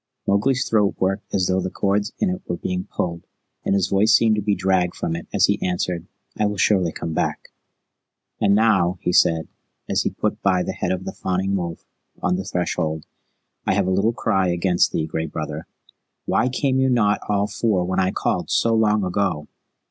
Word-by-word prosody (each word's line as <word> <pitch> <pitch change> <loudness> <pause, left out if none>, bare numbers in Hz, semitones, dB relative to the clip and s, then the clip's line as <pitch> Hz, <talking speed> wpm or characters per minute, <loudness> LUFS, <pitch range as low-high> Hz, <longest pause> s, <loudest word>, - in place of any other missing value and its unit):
Mowgli's 125 +7 +1
throat 105 -3 +2
worked 95 +2 -1
as 95 -2 +1
though 95 +1 +1
the 95 - -2
cords 100 +3 0
in 195 - +1
it 185 +1 -4
were 85 - -2
being 90 +2 -3
pulled, 85 -1 -4 0.4
and - - +1
his 95 -2 +2
voice 105 +3 +3
seemed 110 -2 +4
to 105 - -1
be 105 0 +1
dragged 95 -2 +1
from 80 - -2
it 85 - -7
as - - +4
he - - 0
answered, 90 -1 -2 0.3
"I 105 - +1
will 105 0 -3
surely 95 -3 +2
come 80 - -5
back." - - -2 0.9
"And 100 -1 +3
now," 95 -5 +3
he 90 - 0
said, 80 -2 +3 0.4
as - - +1
he - - 0
put - - -3
by 95 -2 +2
the - - -3
head - - -2
of 95 0 -3
the - - -3
fawning 95 +1 -1
wolf 85 -3 -4 0.3
on 90 0 +1
the 95 +1 -4
threshold, 85 -4 -2 0.6
"I - - +3
have - - +2
a 95 - 0
little 100 +5 +2
cry 100 -5 0
against 90 0 +2
thee, 80 - -1
Gray 80 0 -3
Brother. 75 +1 -5 0.6
Why 125 - +2
came 130 +1 0
ye 130 0 +3
not 105 -5 +2
all 100 -1 +2
four 100 -3 0
when 95 +1 -1
I 95 - +2
called - - -1
so 115 - +2
long 105 -2 +3
ago?" 90 -5 -1
95 Hz, 200 wpm, -22 LUFS, 90-105 Hz, 0.9 s, seemed